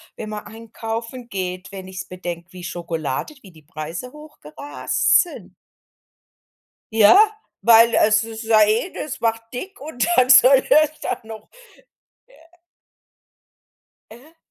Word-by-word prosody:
wenn 215 - -7
man 210 -1 -7
einkaufen 230 +2 -7
geht, 185 -3 -5
wenn 190 -1 -9
ich's 190 0 -7
bedenke, 175 -1 -8
wie 180 -1 -10
Schokolade 170 - -4
wie 195 - -15
die 160 -3 -19
Preise 165 +8 -7
hochgerast 295 - -1
sind. 350 - -12 1.4
Ja, 220 - +6 0.4
weil 230 0 +6
es 215 +1 +3
ist 225 0 -8
ja 220 -1 +4
eh 220 - 0
das 300 - -6
macht 225 0 -1
dick 380 +11 -8
und 260 -6 -3
dann 255 +1 +3
soll 265 +1 +7
es 310 0 +3
da - - -3
noch 220 -1 -11 2.6
Äh. 270 +9 -17
220 Hz, 125 wpm, -21 LUFS, 185-250 Hz, 2.6 s, soll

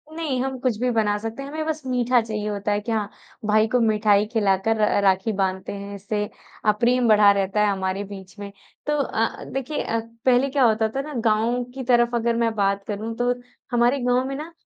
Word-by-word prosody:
नहीं, 295 -6 -2
हम 265 -1 -3
कुछ 245 -4 0
भी 250 0 +1
बना 210 -2 +1
सकते 225 +5 -6
हैं। 280 - -7
हमें 310 +1 -4
बस 310 -1 -2
मीठा 250 -1 +2
चाहिए 215 -2 -4
होता 205 0 -2
है 205 - +1
कि 230 - -4
हाँ, 210 -2 -1 0.4
भाई 215 +1 +3
को 250 +2 +1
मिठाई 210 -2 +3
खिलाकर 215 -1 +1
र 210 -1 +3
राखी 190 +3 +2
बाँधते 190 0 -2
हैं, 200 0 -7
इससे 205 +1 -3 0.4
अ, 210 - +6
प्रेम 240 +3 +2
बढ़ा 210 -2 +6
रहता 200 +1 0
है 210 - +4
हमारे 190 +1 -2
बीच 195 0 -11
में। 200 -1 -7 0.4
तो 295 - +1
अ, 225 -3 -2
देखिए 270 +3 -2
अ, 230 - -1 0.3
पहले 255 +1 +4
क्या 270 -1 +2
होता 220 -1 +3
था 270 - 0
ना 300 +1 -8
गाँव 230 +3 +2
की 265 - -5
तरफ़ 240 -1 +3
अगर 235 0 +1
मैं 230 -1 +1
बात 200 -1 +1
करूँ 220 +2 -4
तो, 245 0 +2 0.4
हमारे 240 +3 +3
गाँव 250 +1 +2
में 275 - -4
ना 310 +4 -7
225 Hz, 215 wpm, -23 LUFS, 205-250 Hz, 0.4 s, अ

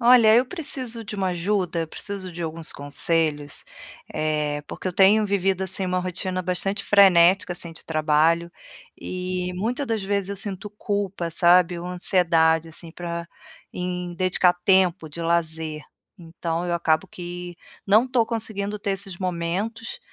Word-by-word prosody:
Olha, 235 -2 +7
eu 245 - +5
preciso 260 -8 -3
de 210 - -7
uma 190 -2 0
ajuda, 180 0 -1
eu 165 - -3
preciso 195 +1 -6
de 175 0 -9
alguns 165 0 -4
conselhos, 145 0 0 0.5
eh, 150 -1 -1
porque - - -7
eu 185 - -1
tenho 205 +4 +5
vivido, 195 -1 0
assim, 190 0 0
uma 185 0 0
rotina 185 +1 -2
bastante 195 +3 -2
frenética, 190 -2 +5
assim, 170 -1 -6
de 165 - -8
trabalho, 160 +2 +2 0.5
e 180 0 -4
muita 235 +9 -2
das 225 -5 -2
vezes 200 -1 -1
eu 200 - -4
sinto 195 +1 -4
culpa, 200 -4 -3
sabe, 175 +1 +4
uma 180 +1 -5
ansiedade, 165 -3 +3
assim, 165 +1 -9
pra 170 -1 -5 0.5
em 180 -1 -4
dedicar 185 0 +3
tempo 185 -4 +3
de 155 +3 -8
lazer, 160 -2 -1 0.3
então 165 -1 -4
eu 175 -1 -1
acabo 165 +1 +1
que 175 0 -7 0.3
não 215 +4 +5
estou 250 -3 +2
conseguindo 210 -3 -3
ter 200 - -3
esses 195 -2 -5
momentos, 190 - -3
180 Hz, 150 wpm, -24 LUFS, 170-200 Hz, 0.5 s, Olha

